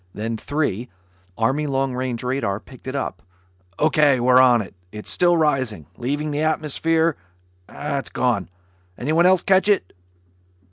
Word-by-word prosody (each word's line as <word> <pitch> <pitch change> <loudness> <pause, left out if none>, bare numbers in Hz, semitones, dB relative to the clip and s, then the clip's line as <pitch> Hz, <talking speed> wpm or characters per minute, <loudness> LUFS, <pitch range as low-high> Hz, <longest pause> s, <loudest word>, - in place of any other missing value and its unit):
Then 115 +2 -3
Three, 125 -3 -2 0.5
Army 135 +7 +1
long 135 -1 0
range 125 -2 -3
radar, 125 -6 -1
picked 130 +3 -15
it 130 - -4
up. 140 - -3 0.6
"O.K., 150 -3 +3
we're 125 +1 +5
on. 120 -5 +4 0.2
It's 105 0 -5
still 175 -1 +3
rising... 130 - 0
leaving 145 - -2
the 145 +1 -1
atmosphere... 155 0 +1 0.5
gone. 125 -8 -2 0.5
Anyone 160 +7 +2
else 185 -1 +4
catch 190 +1 +3
it?" 205 - +1
135 Hz, 130 wpm, -22 LUFS, 125-155 Hz, 0.6 s, we're